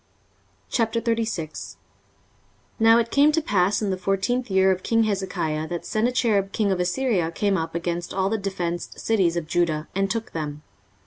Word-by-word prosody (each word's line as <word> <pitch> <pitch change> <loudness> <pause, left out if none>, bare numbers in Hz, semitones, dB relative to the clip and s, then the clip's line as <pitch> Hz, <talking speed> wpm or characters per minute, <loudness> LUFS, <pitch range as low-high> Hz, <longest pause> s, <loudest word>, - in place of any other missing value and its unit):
23:036:001 225 - -1 1.0
Now 225 +1 +6
it 235 0 0
came 290 +2 +5
to 325 - +3
pass 205 - +1
in 200 - 0
the 185 - -1
fourteenth 195 +7 0
year 190 0 +4
of 185 0 -1
king 225 +2 +2
Hezekiah, 185 -7 -2
that 175 0 -5
Sennacherib 215 -3 +1
king 205 -3 +1
of 185 - 0
Assyria 180 -1 +1
came 200 +4 0
up 165 -1 -3
against 170 0 -3
all 190 0 0
the 220 +2 -1
defenced 175 -3 -4
cities 185 -6 +1
of 170 - -2
Judah, 165 -2 0
and 195 +1 0
took 225 +2 -3
them. 150 -2 -5
195 Hz, 165 wpm, -24 LUFS, 175-225 Hz, 1.0 s, Now